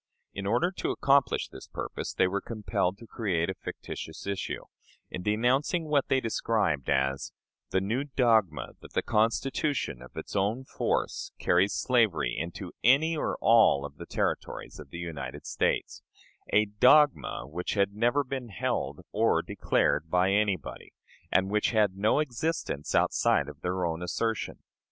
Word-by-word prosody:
In 100 Hz, 0 st, -4 dB
order 120 Hz, -, +2 dB
to -, -, -1 dB
accomplish 135 Hz, -3 st, +2 dB
this -, -, -11 dB
purpose, -, -, -5 dB
they 95 Hz, -, +2 dB
were 100 Hz, +2 st, -2 dB
compelled 105 Hz, -4 st, -2 dB
to 115 Hz, -, -12 dB
create 95 Hz, -6 st, -1 dB
a -, -, -4 dB
fictitious 80 Hz, -3 st, -7 dB
issue, 100 Hz, -1 st, -3 dB, 0.5 s
in 90 Hz, -, -4 dB
denouncing 125 Hz, -, +1 dB
what 150 Hz, -3 st, +1 dB
they 135 Hz, -, +3 dB
described 105 Hz, -, 0 dB
as 65 Hz, 0 st, 0 dB, 0.4 s
"the 95 Hz, -, +1 dB
new 115 Hz, +8 st, -1 dB
dogma 110 Hz, -, +2 dB
that -, -, -13 dB
the -, -, 0 dB
Constitution, 115 Hz, -, 0 dB
of 65 Hz, -, -13 dB
its -, -, -6 dB
own 105 Hz, +7 st, 0 dB
force, -, -, -2 dB
carries 90 Hz, +3 st, +2 dB
slavery 110 Hz, -, +2 dB
into 85 Hz, +3 st, -5 dB
any 150 Hz, +7 st, +4 dB
or 150 Hz, -, -2 dB
all 110 Hz, -11 st, +5 dB
of -, -, -9 dB
the -, -, -9 dB
Territories -, -, -3 dB
of 75 Hz, -3 st, -10 dB
the 85 Hz, -, -8 dB
United 85 Hz, -3 st, -6 dB
States" -, -, -1 dB, 0.5 s
a 105 Hz, +1 st, +4 dB
"dogma" 130 Hz, -, +4 dB
which 90 Hz, +8 st, -3 dB
had 100 Hz, -1 st, +2 dB
never 120 Hz, +7 st, +2 dB
been 130 Hz, -2 st, -5 dB
held 100 Hz, -, -2 dB
or -, -, +2 dB
declared 75 Hz, +3 st, 0 dB
by 90 Hz, +3 st, +3 dB
anybody, 100 Hz, -5 st, -1 dB, 0.4 s
and 95 Hz, +1 st, +2 dB
which 105 Hz, 0 st, +2 dB
had 105 Hz, -4 st, +2 dB
no 105 Hz, +6 st, +2 dB
existence 150 Hz, -, -2 dB
outside 70 Hz, -, +3 dB
of 75 Hz, +1 st, -10 dB
their 90 Hz, 0 st, -1 dB
own 80 Hz, 0 st, -2 dB
assertion. 110 Hz, +5 st, -2 dB
105 Hz, 155 wpm, -28 LUFS, 90-125 Hz, 0.5 s, all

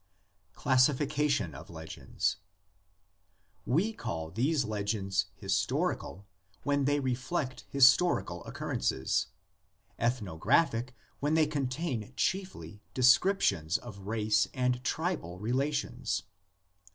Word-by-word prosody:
CLASSIFICATION 140 Hz, -, +2 dB
OF 75 Hz, +8 st, -10 dB
LEGENDS. 80 Hz, -2 st, -3 dB, 1.3 s
We 180 Hz, -, +2 dB
call 80 Hz, -, -5 dB
these 135 Hz, -, +1 dB
legends 100 Hz, -2 st, -1 dB
"historical" 100 Hz, +3 st, -1 dB, 0.4 s
when 140 Hz, -1 st, +1 dB
they 145 Hz, +1 st, +2 dB
reflect 130 Hz, +2 st, -2 dB
historical 130 Hz, -, +4 dB
occurrences, 65 Hz, +1 st, -1 dB, 0.7 s
"ethnographic" 120 Hz, -, +1 dB, 0.2 s
when 150 Hz, +2 st, +1 dB
they 160 Hz, -1 st, +5 dB
contain 135 Hz, -4 st, -3 dB
chiefly 105 Hz, -, -2 dB
descriptions 125 Hz, -, +4 dB
of 100 Hz, -5 st, -10 dB
race 105 Hz, -1 st, +2 dB
and 125 Hz, -1 st, 0 dB
tribal 155 Hz, -, -2 dB
relations. 130 Hz, +8 st, -1 dB
125 Hz, 85 wpm, -30 LUFS, 100-145 Hz, 1.3 s, they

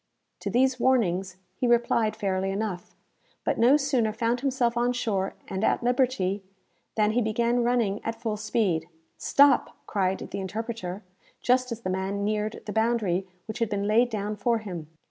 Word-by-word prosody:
To -, -, -3 dB
these 260 Hz, +1 st, +2 dB
warnings 190 Hz, -8 st, +1 dB, 0.2 s
he 245 Hz, +6 st, -1 dB
replied 235 Hz, -2 st, +2 dB
fairly 190 Hz, -1 st, -1 dB
enough, 195 Hz, -2 st, -4 dB, 0.5 s
but -, -, 0 dB
no 255 Hz, +5 st, +6 dB
sooner 265 Hz, -6 st, +1 dB
found 230 Hz, +2 st, 0 dB
himself 250 Hz, -3 st, +1 dB
on 240 Hz, +1 st, +2 dB
shore, 200 Hz, -6 st, -1 dB
and 190 Hz, +2 st, -3 dB
at -, -, +2 dB
liberty, 240 Hz, -6 st, +1 dB, 0.5 s
than 215 Hz, -1 st, +3 dB
he 240 Hz, +3 st, +2 dB
began 235 Hz, +2 st, +1 dB
running 235 Hz, -4 st, +1 dB
at 225 Hz, 0 st, -4 dB
full 220 Hz, -3 st, -2 dB
speed. 195 Hz, -6 st, 0 dB, 0.3 s
"Stop!" 280 Hz, -2 st, +4 dB
cried 190 Hz, -2 st, 0 dB
the -, -, -6 dB
interpreter, 205 Hz, -1 st, -4 dB, 0.4 s
just 255 Hz, 0 st, +2 dB
as 230 Hz, 0 st, -4 dB
the 185 Hz, -, -2 dB
man 190 Hz, +2 st, -2 dB
neared 215 Hz, +1 st, -1 dB
the 210 Hz, -, -5 dB
boundary 220 Hz, -5 st, +1 dB, 0.2 s
which 220 Hz, -, -6 dB
had 230 Hz, -2 st, +1 dB
been 200 Hz, -2 st, -1 dB
laid 225 Hz, +4 st, +3 dB
down 210 Hz, -1 st, -3 dB
for 235 Hz, +3 st, +2 dB
him. 180 Hz, -8 st, -6 dB
220 Hz, 165 wpm, -27 LUFS, 195-240 Hz, 0.5 s, no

